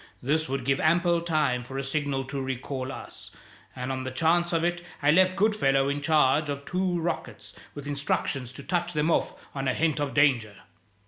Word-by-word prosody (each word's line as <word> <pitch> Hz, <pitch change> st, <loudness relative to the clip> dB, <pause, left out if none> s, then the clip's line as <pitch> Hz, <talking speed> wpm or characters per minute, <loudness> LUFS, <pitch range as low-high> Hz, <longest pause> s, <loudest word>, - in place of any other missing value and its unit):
This 155 Hz, +4 st, 0 dB
would 135 Hz, -1 st, -2 dB
give 135 Hz, 0 st, +2 dB
ample 170 Hz, +1 st, +3 dB
time 150 Hz, -7 st, +1 dB
for 130 Hz, +2 st, -7 dB
a 135 Hz, -, -2 dB
signal 135 Hz, -1 st, -1 dB
to 135 Hz, 0 st, -4 dB
recall 130 Hz, 0 st, -4 dB
us, -, -, -10 dB, 0.5 s
and 125 Hz, 0 st, -3 dB
on 130 Hz, 0 st, -3 dB
the 130 Hz, -, -4 dB
chance 165 Hz, +6 st, +2 dB
of 165 Hz, -1 st, +1 dB
it 175 Hz, 0 st, 0 dB, 0.2 s
I 145 Hz, -, +6 dB
left 185 Hz, +2 st, +4 dB
Goodfellow 140 Hz, -10 st, +2 dB
in 145 Hz, +1 st, -2 dB
charge 150 Hz, 0 st, +3 dB
of 140 Hz, 0 st, -4 dB
two 180 Hz, -1 st, 0 dB
rockets 170 Hz, +1 st, -4 dB, 0.2 s
with 145 Hz, -1 st, -7 dB
instructions 140 Hz, -3 st, -2 dB
to 140 Hz, -, -10 dB
touch 175 Hz, +1 st, -1 dB
them 155 Hz, +1 st, +1 dB
off -, -, +1 dB, 0.2 s
on 135 Hz, -1 st, -3 dB
a 130 Hz, -, +1 dB
hint 155 Hz, -2 st, +1 dB
of 145 Hz, -2 st, -2 dB
danger." 125 Hz, -8 st, +3 dB
145 Hz, 195 wpm, -27 LUFS, 135-165 Hz, 0.5 s, I